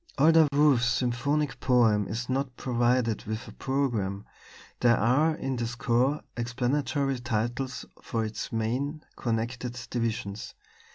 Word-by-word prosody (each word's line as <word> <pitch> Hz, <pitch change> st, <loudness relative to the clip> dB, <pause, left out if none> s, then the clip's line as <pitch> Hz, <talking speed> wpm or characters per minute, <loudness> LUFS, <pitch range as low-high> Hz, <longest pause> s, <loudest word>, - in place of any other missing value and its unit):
Although 160 Hz, 0 st, +6 dB
Wolf's 140 Hz, -4 st, +4 dB
symphonic 135 Hz, +5 st, 0 dB
poem 115 Hz, -6 st, +3 dB
is 115 Hz, +5 st, -4 dB
not 130 Hz, -1 st, -2 dB
provided 120 Hz, -2 st, +1 dB
with 110 Hz, +4 st, -4 dB
a -, -, -9 dB
programme, 110 Hz, -8 st, -1 dB, 0.5 s
there 120 Hz, -1 st, +4 dB
are 145 Hz, +8 st, +3 dB
in 135 Hz, -4 st, -3 dB
the 120 Hz, -1 st, -1 dB
score 120 Hz, +4 st, +1 dB
explanatory 130 Hz, +3 st, -1 dB
titles 120 Hz, +2 st, -2 dB, 0.2 s
for 115 Hz, -1 st, -2 dB
its 110 Hz, 0 st, -5 dB
main 130 Hz, +7 st, -2 dB
(connected) 120 Hz, +1 st, -3 dB
divisions. 110 Hz, -4 st, -3 dB
120 Hz, 120 wpm, -28 LUFS, 115-135 Hz, 0.5 s, Although